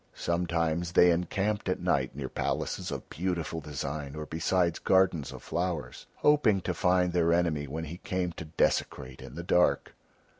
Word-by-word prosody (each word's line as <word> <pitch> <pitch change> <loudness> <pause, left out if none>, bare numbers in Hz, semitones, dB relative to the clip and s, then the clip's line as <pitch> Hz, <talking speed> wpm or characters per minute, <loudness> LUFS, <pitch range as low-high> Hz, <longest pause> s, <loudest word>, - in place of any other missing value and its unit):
Sometimes 85 -1 -1
they 90 0 +7
encamped 95 +4 -1
at 90 - 0
night 70 -8 0
near 70 -2 -4
palaces - - -2
of - - -5
beautiful 85 -1 -3
design 70 0 -5
or 75 0 -5
beside 85 +2 0
gardens 95 -6 +3
of - - -10
flowers, 85 -8 -3
hoping 145 -9 +4
to - - -2
find 90 -2 +2
their 85 -1 +3
enemy 85 -4 +1
when 80 +4 -4
he 80 +2 -6
came 90 -1 -2
to 80 - -8
desecrate 65 -4 -1
in 65 - -10
the 85 - -5
dark. 90 0 +2
85 Hz, 160 wpm, -29 LUFS, 75-90 Hz, -, they